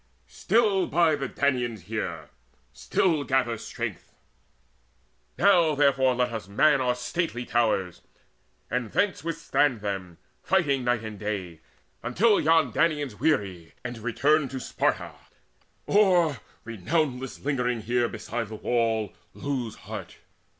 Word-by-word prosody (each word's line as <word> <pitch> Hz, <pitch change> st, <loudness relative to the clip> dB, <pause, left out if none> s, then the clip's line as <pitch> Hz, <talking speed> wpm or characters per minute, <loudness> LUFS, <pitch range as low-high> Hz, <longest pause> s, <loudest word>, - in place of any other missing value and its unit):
Still 210 Hz, -5 st, +1 dB
bide 160 Hz, -3 st, +3 dB
the 135 Hz, -, -2 dB
Danaans 125 Hz, -, -1 dB
here, 85 Hz, -7 st, -5 dB, 0.4 s
still 160 Hz, -6 st, +1 dB
gather 130 Hz, -4 st, +1 dB
strength: -, -, -6 dB, 1.2 s
Now 175 Hz, -5 st, +4 dB
therefore 135 Hz, -3 st, +3 dB
let 125 Hz, -1 st, 0 dB
us 110 Hz, -3 st, -5 dB
man 135 Hz, +7 st, +3 dB
our 125 Hz, -1 st, +1 dB
stately 125 Hz, -1 st, -3 dB
towers, 105 Hz, -8 st, 0 dB, 0.7 s
And 120 Hz, -3 st, -2 dB
thence 200 Hz, -5 st, +1 dB
withstand 145 Hz, -7 st, 0 dB
them, 95 Hz, -4 st, -4 dB, 0.2 s
fighting 145 Hz, -9 st, +1 dB
night 120 Hz, -2 st, 0 dB
and 110 Hz, -2 st, -7 dB
day, 95 Hz, -6 st, -4 dB, 0.4 s
Until 200 Hz, -, +3 dB
yon 160 Hz, -4 st, +3 dB
Danaans 150 Hz, -9 st, 0 dB
weary, 95 Hz, -, -1 dB
and 120 Hz, -2 st, -5 dB
return 140 Hz, +6 st, +2 dB
To 130 Hz, 0 st, -5 dB
Sparta, -, -, -1 dB, 0.7 s
or, 180 Hz, -8 st, +4 dB, 0.3 s
renownless 130 Hz, -, -2 dB
lingering 125 Hz, -5 st, 0 dB
here 120 Hz, +2 st, 0 dB
Beside 115 Hz, +1 st, -4 dB
the 110 Hz, -, -8 dB
wall, 110 Hz, -2 st, 0 dB, 0.2 s
lose 130 Hz, -6 st, -3 dB
heart. -, -, -7 dB
125 Hz, 120 wpm, -26 LUFS, 110-155 Hz, 1.2 s, Now